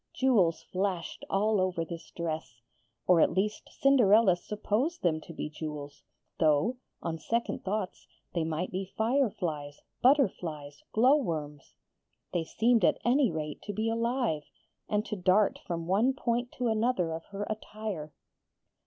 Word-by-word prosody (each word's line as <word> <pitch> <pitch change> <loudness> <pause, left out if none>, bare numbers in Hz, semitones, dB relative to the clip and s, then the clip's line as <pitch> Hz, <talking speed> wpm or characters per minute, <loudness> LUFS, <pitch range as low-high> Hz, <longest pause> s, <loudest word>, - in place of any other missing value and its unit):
Jewels 210 -11 +3
flashed 185 -2 -3
all 205 0 +2
over 180 -3 0
this 165 -1 -8
dress 155 -8 -5 0.4
or 180 -3 +5
at - - +4
least 210 +3 -1
Cinderella 225 -8 +5
supposed 215 - -2
them 160 -3 +2
to - - -11
be 165 - -4
jewels, 150 -2 -7 0.4
though, 160 - +3 0.3
on 165 -1 -3
second 235 +6 -2
thoughts, 195 -1 -3 0.3
they 170 - 0
might 160 +3 -2
be 185 +1 -2
fireflies, 190 - -1 0.2
butterflies, 170 - +1
glowworms. 170 - +1 0.6
They 175 - +1
seemed 230 +5 +2
at - - +4
any 255 +1 +4
rate 155 -3 -4
to 205 - -5
be 220 +3 0
alive, 230 - -1 0.4
and 210 0 +1
to 215 - -3
dart 190 +2 +3
from 170 -2 -3
one 210 +9 +3
point 240 -2 -1
to 245 - -1
another 220 -6 +1
of 160 0 -5
her 200 0 -5
attire. 215 -7 -5
190 Hz, 140 wpm, -30 LUFS, 160-230 Hz, 0.6 s, or